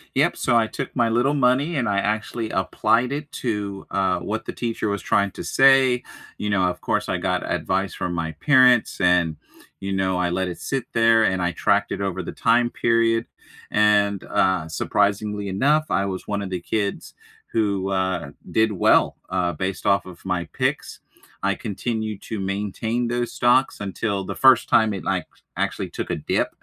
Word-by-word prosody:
Yep, - - +2
so 120 - +1
I 115 -1 +2
took 135 - -6
my 120 -2 +2
little 120 +5 +2
money 140 +4 +2
and 130 -4 0
I 100 -1 +1
actually 110 +2 -2
applied 125 +3 +1
it 145 +1 -5
to, 105 -4 -3
uh, 95 -2 +1
what 110 +2 -4
the - - -5
teacher 115 -3 -2
was 100 -1 -2
trying 100 -1 +1
to - - -8
say, 135 -2 +4 0.3
you 105 - -3
know, 100 -2 +2
of 90 -1 -1
course, - - -1
I - - 0
got - - -2
advice 95 -1 -1
from 90 - -3
my 80 -1 -2
parents, 125 - +4
and, 85 -3 +3 0.4
you 95 0 -4
know, 95 -1 0
I 90 -1 0
let 95 +1 -1
it 90 - -6
sit 135 -3 -3
there, 115 0 +4
and 95 -3 +1
I 90 0 0
tracked 85 - +1
it - - -3
over 95 -1 -2
the - - -6
time 120 +1 +2
period, 115 -1 +1 0.5
and, 105 -2 +3
uh, 95 -4 +1
surprisingly 100 +4 0
enough, 145 +11 +2
I 100 - +1
was 95 -1 -5
one 100 -1 -2
of 100 - -5
the 90 -2 -4
kids 100 +1 -3 0.4
who, 100 -3 0
uh, 95 -6 -1 0.2
did 110 0 +2
well, 95 - +3
uh, 90 -2 0
based 95 +4 -4
off 100 0 +2
of 90 -2 -13
my 90 -1 -1
picks. - - -2 0.4
I 100 0 +1
continued 110 -1 -4
to 110 - -5
maintain 105 +5 -2
those 120 0 -2
stocks 125 +1 +2
until 100 0 -2
the - - -5
first 130 -3 +5
time 110 -2 +4
it, 95 - -6
like, - - -1 0.3
actually - - -2
took - - -5
a - - 0
dip, - - -1
105 Hz, 185 wpm, -23 LUFS, 95-115 Hz, 0.5 s, first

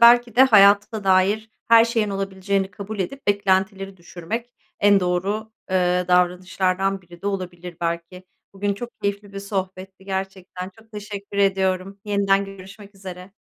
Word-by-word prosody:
belki 240 0 +6
de 260 - +8
hayata 205 -2 +5
dair 195 +4 +2 0.2
her 230 0 +8
şeyin 225 -3 0
olabileceğini 195 0 -2
kabul 205 +1 -7
edip 270 +9 -4
beklentileri 195 -1 +1
düşürmek 180 +8 -6 0.3
en 200 -1 +5
doğru, 195 +5 -1 0.2
ııı, 180 -1 +1
davranışlardan 185 +2 +1
biri 175 0 -16
de - - -4
olabilir 180 -3 -4
belki. 170 +2 -4 0.3
Bugün 200 +1 -1
çok 240 +3 -7
keyifli 200 0 -3
bir 195 - -6
sohbetti, 190 -1 -5
gerçekten 190 -1 -5
çok 220 0 -20
teşekkür 205 -1 -7
ediyorum. 190 0 +1
Yeniden 200 -1 +2
görüşmek 195 +1 -12
üzere. 185 0 -10
195 Hz, 140 wpm, -22 LUFS, 185-205 Hz, 0.3 s, de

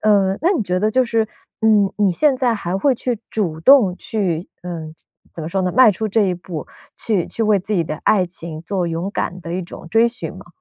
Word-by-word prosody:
嗯， 200 -2 +3
那 345 - +3
你 345 - 0
觉 180 0 -1
得 215 +2 +2
就 255 +3 +3
是， 230 -2 +1 0.4
嗯， 215 -3 +4
你 200 -2 +3
现 275 - +2
在 250 -2 +1
还 190 -4 -2
会 270 +8 +3
去 245 0 -2
主 170 -7 -2
动 215 -7 +6
去 185 -6 -2
嗯， 165 -3 -6 0.4
怎 - - -8
么 155 - -4
说 190 +2 -1
呢， 180 - 0
迈 250 -1 +6
出 215 +3 -3
这 215 +2 +2
一 185 -2 +1
步， 170 -2 -7 0.3
去 205 -7 0
去 - - -8
为 210 -1 +4
自 205 +3 -5
己 170 -4 +1
的 155 - -4
爱 190 -4 +3
情 165 -2 -8
做 185 0 -2
勇 170 +3 -2
敢 180 +2 -3
的 170 -1 -7
一 185 - -2
种 170 - -10
追 225 +5 +4
寻 240 - -6
吗？ - - -12
195 Hz, 250 characters per minute, -20 LUFS, 175-220 Hz, 0.4 s, 动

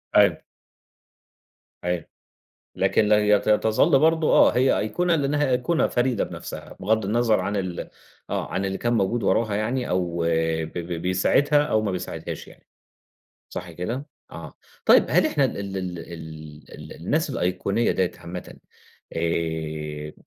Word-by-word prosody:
أيوه. - - +5 1.4
أيوه، 90 -2 -1 0.7
لكن 105 - +2
لا 105 0 +5
ي 105 -1 +4
تظل 110 +5 +3
برضه 160 0 +3
آه، - - +6
هي 130 +2 +3
أيقونة 175 +11 +1
لأنها 145 -1 +1
أيقونة 125 +7 +2
فريدة 125 -2 +1
بنفسها - - -8
بغض 110 +1 +1
النظر 115 +1 +2
عن 105 - -2
ال 90 -3 -4 0.4
آه، - - -3
عن 95 - -1
اللي 95 0 -2
كان 120 0 0
موجود 115 +2 +1
وراها 110 -3 +1
يعني 120 +4 -1
أو 90 -2 -1 0.5
ب 80 - -11
ب 85 0 -5
بيساعدها 140 - +3
أو 110 -7 +1
ما 105 - -1
بيساعدهاش 90 -3 -5
يعني - - -18 0.8
صح 90 -1 -6
كده؟ 115 - -4 0.3
آه 75 -2 -9 0.3
طيب - - +6
هل - - +4
إحنا - - +2
ال - - -3
ال 100 -1 -4
ال 90 -2 -4
ال 80 -2 -10
ال 75 0 -10
الناس 150 - -1
الأيقونية 100 0 0
ديّة 95 -2 0
عامةً 90 +1 -8 0.6
آآ، 80 -2 -3
100 Hz, 145 wpm, -24 LUFS, 85-120 Hz, 1.4 s, آه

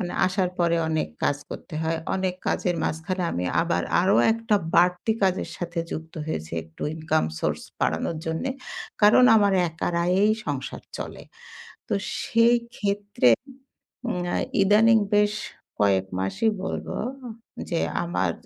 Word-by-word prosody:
মানে 175 -3 -3
আসার 185 -1 0
পরে 170 -1 +2
অনেক 160 -1 0 0.2
কাজ 145 - +2
করতে - - -8
হয়। 160 0 0 0.2
অনেক 185 -1 -1
কাজের 175 -1 0
মাঝখানে 170 +4 -2
আমি 90 - -2 0.2
আবার 85 +1 0 0.2
আরো 195 +2 +4 0.2
একটা 225 -2 +1 0.2
বাড়তি 180 +5 +3
কাজের 190 -1 +1
সাথে 175 -1 -4
যুক্ত 160 +1 -6
হয়েছি, 80 - -4
একটু 80 0 -12
ইনকাম 155 0 0 0.2
source - - -1 0.2
বাড়ানোর 80 - 0
জন্যে। 160 +12 -2 0.5
কারণ, 210 +4 +7
আমার 205 -2 +4 0.2
একার 165 +1 -3
আয়েই 195 +4 +4
সংসার 140 -2 -4 0.2
চলে। - - -6 0.7
তো - - -2 0.3
সেইক্ষেত্রে 225 - +2 0.8
উম 180 -7 -1 0.4
ইদানিং 220 +3 +5 0.2
বেশ 210 0 +3 0.5
কয়েক 95 -2 +3
মাসই 95 - +1
বলবো, - - -4 0.7
যে 170 - 0 0.2
আমার 95 - 0
180 Hz, 130 wpm, -25 LUFS, 160-205 Hz, 0.8 s, কারণ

